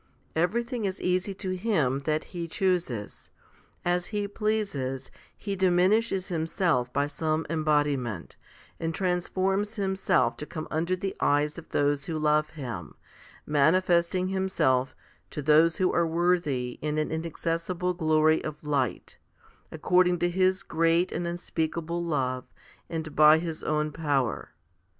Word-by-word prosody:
Everything 235 - 0
is 190 -1 -3
easy 185 +2 0
to 190 -1 -4
Him 180 - +1
that 155 0 0
He 170 -2 -4
chooses. 170 - -2 0.6
As 175 0 +1
He 205 -1 -2
pleases, 195 -12 -2 0.3
He 200 -1 -4
diminishes 190 +2 +2
Himself 160 -6 0
by 140 +2 +1
some 155 +2 -1
embodiment, 145 - 0 0.4
and 165 0 -2
transforms 190 +3 0
Himself 190 -2 +1
to 150 - -7
come 155 0 -6
under 170 +4 0
the 190 +1 -4
eyes 150 +2 +1
of 170 - -14
those 145 0 +1
who 160 - -3
love 150 0 +2
Him, 120 - -7 0.5
manifesting 170 +4 +2
Himself 190 -9 +1 0.3
to 150 - -5
those 155 +3 +5
who 185 - +1
are 170 -1 +2
worthy 160 -7 0
in 150 0 -2
an 155 - -1
inaccessible 165 +2 -2
glory 155 -2 +3
of 150 0 -6
light, 145 -2 -2 0.5
according 180 +3 +3
to 175 +1 0
His 185 +1 +2
great 165 +2 +2
and 175 - -2
unspeakable 170 0 -3
love, 130 -6 -1 0.4
and 160 -3 -5
by 155 +1 +7
His 160 -1 -4
own 150 0 0
power. 145 -6 -1
165 Hz, 130 wpm, -27 LUFS, 150-185 Hz, 0.6 s, by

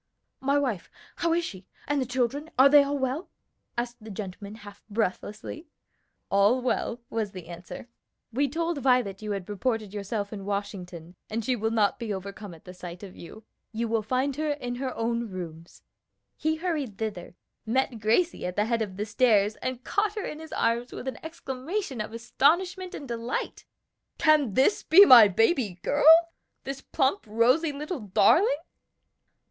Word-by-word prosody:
"My 275 +2 +1
wife! 250 -11 -1 0.3
how 335 - 0
is 340 0 +1
she? 185 - -9 0.2
and 290 -1 +1
the 255 - -2
children? 260 +5 -1
are 265 +2 +8
they 290 0 +8
all 280 +1 -1
well?" 265 +5 -2 0.5
asked 240 -1 -4
the 220 - -9
gentleman 200 0 -7
half 205 -2 -13
breathlessly. 215 - -3 0.6
"All 200 +6 +4
well," 245 -1 -1
was 220 -3 -2
the 185 -3 -8
answer. 175 +6 -9 0.5
"We 280 +3 +1
told 330 +1 -2
Violet 250 -7 +2
you 210 -1 -3
had 195 -3 -5
reported 215 0 -2
yourself 205 0 -3
in 200 -2 -6
Washington, 185 -4 -5 0.2
and 220 0 -3
she 255 - +1
will 220 -1 -1
not 215 -3 +1
be 230 -3 -4
overcome 200 -1 -6
at 180 +3 -13
sight 180 +1 -9
of 190 -2 -10
you. 215 +6 -11 0.3
You 230 +1 -1
will 225 0 +1
find 260 +5 -1
her 310 0 -1
in 245 -4 -5
her 260 0 -3
own 235 0 -1
rooms." 170 -3 -9 0.5
He 315 +1 0
hurried 310 - -3
thither, 200 -6 -5 0.3
met 255 0 0
Gracie 225 - +1
at 180 - -5
the 210 - +2
head 230 0 0
of 195 -4 -4
the 210 - -2
stairs, 215 -2 +3
and 255 -1 -4
caught 415 +1 0
her 420 - -3
in 305 - -6
his 320 0 -10
arms 235 +2 0
with 260 - -7
an 265 - -5
exclamation 315 - -4
of 215 - -5
astonishment 345 - +1
and 280 - -8
delight. 235 0 -4 0.5
"Can 295 -9 +3
this 270 +10 +3
be 385 +6 +8
my 235 - +10
baby 220 - +1
girl? 325 +4 +6 0.3
this 275 0 -5
plump, 270 +10 0
rosy 250 +9 +3
little 300 +3 -5
darling?" 250 - +4
235 Hz, 170 wpm, -27 LUFS, 205-280 Hz, 0.6 s, my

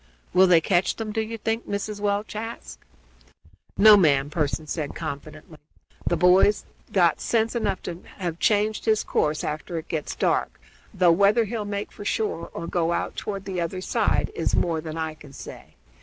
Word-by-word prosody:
"Will 185 +1 +6
they 170 -2 +6
catch 180 +2 +1
them, 220 -2 -4
do 220 +1 -1
you 225 +1 -5
think?" 225 +2 -3
Mrs. 205 +1 -3
Welch 205 +1 -1
asked. 225 +2 -7 1.0
"No, 215 +1 +9
ma'am," 145 -7 +3
Pearson 155 0 -1
said 150 -1 -4
confidently. 155 +1 -7 0.5
"The 175 - +2
boy's 185 +3 +4 0.3
got 175 -4 +3
sense 230 0 0
enough 230 -5 -1
to 175 0 -6 0.2
have 175 -3 -4
changed 215 0 +1
his 220 -1 +2
course 150 0 0
after 155 +3 -4
it 160 - -7
gets 155 -3 -3
dark, - - 0 0.3
though 180 -4 +4
whether 200 +6 +4
he'll 215 0 -4
make 205 0 -4
for - - -10
shore 205 -5 -2
or 170 - -6
go 170 0 0
out - - -2
toward 195 -2 -5
the 185 -3 -3
other 170 +2 -3
side 185 - 0
is - - 0
more 165 -2 0
than 160 0 -6
I 160 -1 -2
can 150 -3 -15
say. - - -11
185 Hz, 180 wpm, -25 LUFS, 160-210 Hz, 1.0 s, No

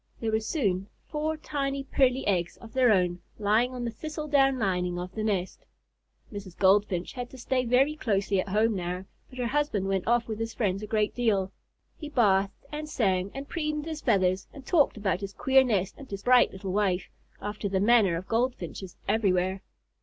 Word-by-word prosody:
there 225 -1 -1
were 220 - +2
soon 205 - -1 0.2
four 310 +1 -2
tiny, 275 -2 -2
pearly 265 -1 +2
eggs 175 -3 0
of 225 -1 -13
their 255 -3 +4
own 180 -3 +2 0.2
lying 215 +4 +2
on 250 -1 -4
the 235 - -2
thistle 305 +5 -6
down 270 -2 +4
lining 180 -5 0
of 180 +1 -5
the 215 - -3
nest. 195 -4 -2 0.7
Mrs. 195 -3 -8
Goldfinch 190 -2 +2
had 245 -1 -5
to 260 - -12
stay 255 +1 0
very 265 +5 +3
closely 200 -6 0
at 185 - -2
home 215 +2 +2
now, 180 0 -3 0.2
but 255 - -13
her 250 - -1
husband 235 -6 0
went 195 -2 -1
off 235 0 +2
with 220 -1 -4
his 225 0 -4
friends 195 -3 0
a 210 - -6
great 215 -1 +1
deal. 205 -6 +1 0.5
He 300 - -6
bathed 200 -6 +2
and 305 0 -5
sang 190 -7 +1
and 275 +1 -6
preened 305 -2 -2
his 315 -1 -5
feathers 190 -5 +2
and 275 -2 -12
talked 300 -9 +3
about 195 -2 -1
his 200 0 -5
queer 265 +4 +4
nest 200 -6 0
and 275 - -11
his 200 -1 -6
bright 250 0 +5
little 190 0 -5
wife, 195 -3 +1 0.3
after 210 0 -4
the 190 -1 +1
manner 210 -4 +4
of 180 - -7
Goldfinches 225 -6 -2
everywhere. 190 -3 +1
215 Hz, 195 wpm, -28 LUFS, 190-260 Hz, 0.7 s, bright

